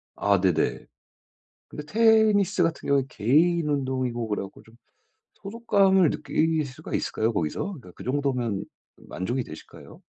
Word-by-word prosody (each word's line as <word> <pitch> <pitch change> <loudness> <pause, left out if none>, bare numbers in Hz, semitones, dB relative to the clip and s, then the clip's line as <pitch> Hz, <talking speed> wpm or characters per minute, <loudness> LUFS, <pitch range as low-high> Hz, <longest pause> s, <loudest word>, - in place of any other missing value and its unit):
아 100 -1 +2
네네. 90 -4 0 0.8
근데 150 - -8
테니스 215 -2 +3
같은 165 -1 -1
경우는 140 -2 +2
개인 155 +9 +2
운동이고 130 -5 -2
그래가지고 100 -2 -5
좀 115 +1 -20 0.7
소속감을 195 -4 +2
느낄 160 -1 0
수가 130 -1 -9
있을까요 110 +2 -1
거기서? 105 - -3
예 - - -12
그 - - -11
정도면 125 -6 -1 0.3
만족이 120 +9 -4
되실까요? 80 -5 -13
140 Hz, 305 characters per minute, -25 LUFS, 115-180 Hz, 0.8 s, 테니스